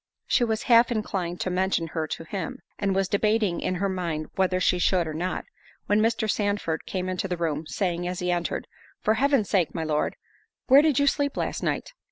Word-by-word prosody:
She 245 - +2
was 220 -2 0
half 235 0 +5
inclined 190 -6 -2
to 185 - -1
mention 185 -2 +1
her 160 -1 -2
to 165 - -5
him, 170 +1 -5 0.2
and 195 -1 0
was 195 -1 +2
debating 210 -2 +1
in 185 - -1
her 195 +3 0
mind 170 -5 -3
whether 185 -1 +1
she 180 -1 +2
should 175 -1 +2
or 155 - -4
not, 175 +4 -3 0.4
when 205 +1 +3
Mr. 225 0 +1
Sandford 205 -6 -1
came 185 -1 -2
into 185 +1 -2
the 180 -1 -2
room, 160 -2 -2
saying, 175 -3 -1
as 180 0 -3
he 180 0 -1
entered, 175 -1 -1 0.4
"For 215 - +4
Heaven's 270 -2 +2
sake, 185 -5 +2
my 165 - -1
Lord, 150 -1 0 0.5
where 275 +2 +7
did 300 -4 +2
you 285 - +4
sleep 285 0 +1
last - - -2
night?" - - -2
185 Hz, 210 wpm, -26 LUFS, 175-215 Hz, 0.5 s, where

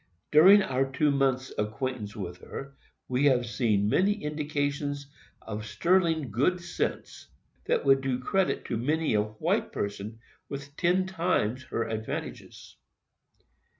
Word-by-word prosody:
During 190 +7 +8
our 135 -4 -1
two 145 +2 +2
months' 135 -2 0
acquaintance 110 0 -3
with 90 -3 -6
her, 140 +7 -8 0.3
we 130 +3 +1
have 125 -3 +4
seen 110 -4 +1
many 190 - +3
indications 145 -1 -2 0.4
of 105 -1 -5
sterling 160 - +1
good 145 - +1
sense, 170 0 -4 0.4
that - - 0
would 135 0 +5
do 130 -2 -1
credit 190 +9 0
to 115 - -2
many 150 +5 0
a 105 - +3
white 110 +1 -1
person 100 +2 -4 0.3
with 140 0 -7
ten 180 +3 +2
times 165 - -1
her 115 - -2
advantages. 110 -1 -6
135 Hz, 130 wpm, -28 LUFS, 110-155 Hz, 0.4 s, During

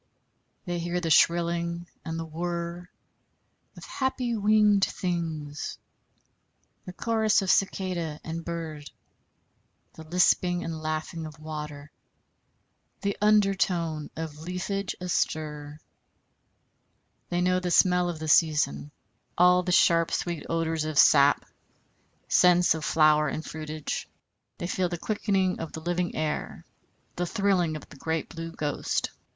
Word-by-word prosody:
They 175 -2 -2
hear 175 +1 -2
the 165 -2 -2
shrilling 170 +1 +2 0.2
and 165 -1 -4
the 165 - -4
whirr 170 +2 -4 0.9
of - - -10
happy 255 -3 -2
winged 210 -1 +4
things, 160 -6 -3 1.1
the 180 - -6
chorus 220 +1 +1
of 190 - +2
cicada 180 -5 0
and 165 +1 -5
bird, 160 -3 -6 1.0
the - - -11
lisping 180 +1 +2
and 160 -1 -5
laughing 155 +1 -3
of 155 0 -12
water, 150 -1 -7 1.1
the 200 -1 -1
under 210 -2 +4
tone 165 -5 -1
of 155 -2 -6
leafage 180 +3 -3
astir. 150 -4 -2 1.5
They 175 - 0
know 185 0 +2
the 180 -1 -3
smell 180 0 +4
of 170 - -4
the 155 0 -6
season 150 - +2 0.5
all 180 +1 +5
sharp 170 -2 +4
sweet 170 -3 -3
odors 165 -1 0
of 155 -2 -4
sap, 140 -2 +6 0.8
scents 180 -1 +5
of 160 -1 -5
flower 155 -1 +4
and 155 +2 -4
fruitage. 155 -1 -5 0.5
They - - -4
feel 180 0 -1
the 175 - -3
quickening 195 -1 0
of 165 - -6
the - - -5
living 175 +1 -2
air, 155 -1 -3 0.5
the 175 0 -1
thrilling 190 -6 +1
of 155 - -8
the 140 - -13
great 160 +2 -2
Blue 165 0 -6
Ghost. 150 -3 -2
170 Hz, 125 wpm, -27 LUFS, 155-180 Hz, 1.5 s, sap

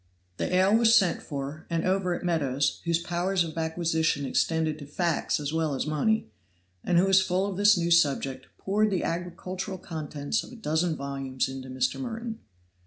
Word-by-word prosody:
The - - -2
ale 190 +3 +4
was 230 0 +5
sent 180 -4 +3
for, 140 +1 -6
and 165 -1 -1
over 185 -1 +1
it - - -7
Meadows, 145 -5 0
whose 170 -1 +2
powers 175 +2 0
of 160 -2 -7
acquisition 160 -2 0
extended 160 +2 0
to 145 - -9
facts 170 +1 0
as 145 0 -3
well 160 -3 0
as - - -2
money, 155 +9 +1 0.6
and 175 - +2
who 180 - +5
was 195 0 +5
full 190 +1 0
of 200 -2 -3
this 205 +1 +5
new 170 0 0
subject, 140 -5 +2
poured 210 +2 +1
the 190 -3 -1
agricultural 180 +2 -4
contents 155 +1 -3
of - - -12
a - - -10
dozen 165 -5 0
volumes 135 -2 -3
into 130 0 -7
Mr. 130 0 -1
Merton. 230 -3 -5
170 Hz, 180 wpm, -27 LUFS, 150-190 Hz, 0.6 s, was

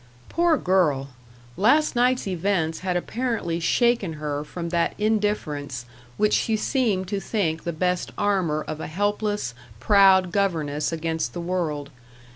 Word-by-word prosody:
Poor 340 -2 +3
girl! 160 - +1 0.5
last 280 +9 +3
night's 250 +1 +2
events 180 -3 -1
had 185 -1 -1
apparently 220 -5 -2
shaken 220 +1 +2
her 150 -1 -3
from 170 +3 -6
that 170 0 0
indifference 155 - -1 0.3
which 210 0 +2
she 220 - +2
seemed 215 -7 0
to 200 +1 -2
think 170 -7 -2
the 170 - -1
best 180 +2 -1
armour 180 -7 0
of 155 - -5
a - - -4
helpless, 205 - -1 0.3
proud 190 - +5
governess 160 -7 0
against 160 0 -2
the 175 - -5
world. 160 -5 -2
180 Hz, 135 wpm, -24 LUFS, 160-210 Hz, 0.5 s, proud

